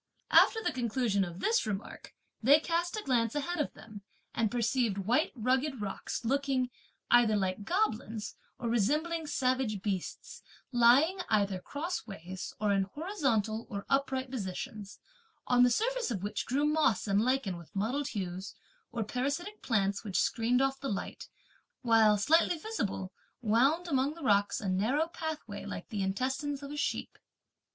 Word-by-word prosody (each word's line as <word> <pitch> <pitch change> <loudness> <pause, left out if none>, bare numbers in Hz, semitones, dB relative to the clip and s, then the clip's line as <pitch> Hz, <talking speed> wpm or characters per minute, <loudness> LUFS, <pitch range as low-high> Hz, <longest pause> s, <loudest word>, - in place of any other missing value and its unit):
After 445 - +6
the - - +1
conclusion 235 -4 0
of 175 -1 -6
this 455 - +2
remark, 200 -1 -6 0.3
they 280 +6 +7
cast 345 +4 -1
a 430 - -4
glance 235 -3 +1
ahead 345 +4 -2
of 300 - -2
them, 215 -2 -11 0.3
and 225 -2 +1
perceived 235 -2 +1
white 235 - +1
rugged 260 +3 0
rocks 205 +3 -4
looking, 265 0 +1 0.4
either 240 -3 +6
like 195 0 -1
goblins, 230 - -1 0.2
or 240 - -4
resembling 300 +9 +1
savage 255 -7 0
beasts, 195 -4 -4 0.3
lying 260 +10 +5
either 200 -3 +2
crossways, 195 - -5
or 210 -1 +1
in 195 -1 +2
horizontal 235 - -1
or 200 -2 -5
upright 265 -1 0
positions; 205 -2 -5 0.5
on 245 0 +4
the 250 - +7
surface - - 0
of 200 -6 -3
which 205 - -3
grew 280 +4 +1
moss 300 -8 +2
and 200 +1 +3
lichen 250 -6 0
with 170 -2 -11
mottled 250 +8 -1
hues, 190 -2 -5 0.4
or 230 - -2
parasitic 285 - -3
plants, 200 -4 0
which 195 -4 -1
screened 245 +3 +2
off 270 0 0
the 275 - -3
light; 200 -2 -5 0.5
while, 225 -3 +5
slightly 325 - +3
visible, 225 - -3 0.3
wound, 270 +11 +3
among 280 -1 +1
the 335 - -10
rocks, 205 -4 +3
a 205 - -4
narrow 220 +12 +1
pathway 315 -2 -5
like - - -7
the 210 -4 -3
intestines 265 +8 -2
of 280 - -7
a - - -5
sheep. 295 - -3
240 Hz, 155 wpm, -31 LUFS, 205-285 Hz, 0.5 s, they